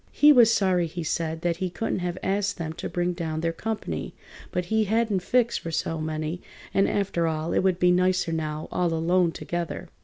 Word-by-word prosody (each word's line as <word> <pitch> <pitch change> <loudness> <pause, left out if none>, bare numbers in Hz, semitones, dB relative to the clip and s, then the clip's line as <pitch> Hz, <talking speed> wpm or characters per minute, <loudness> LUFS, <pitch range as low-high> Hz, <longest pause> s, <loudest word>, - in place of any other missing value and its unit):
He 295 +1 +6
was 240 -5 +7
sorry, 185 -5 +2
he 170 +1 -5
said, 160 0 -2
that 170 -1 0
he 185 0 -2
couldn't 225 +3 -2
have 175 0 -3
asked 200 +1 0
them 160 -2 -4
to - - -5
bring 175 0 -1
down 160 -2 -3
their 165 0 0
comp'ny, 220 +5 -4 0.4
but 180 -1 -1
he 220 +4 +1
hadn't 220 -1 +1
fixed 240 +4 +1
for 165 - -6
so 165 0 -2
many, 155 +2 -3 0.3
and, 195 - +3
after 185 -4 0
all, 160 +1 -2
it - - +3
would 185 -2 +2
be 180 -1 +4
nicer 185 -1 +2
now, 155 -1 -3
all 175 -2 +1
alone 170 +1 +2
together. 175 0 -4
175 Hz, 205 wpm, -26 LUFS, 165-195 Hz, 0.4 s, was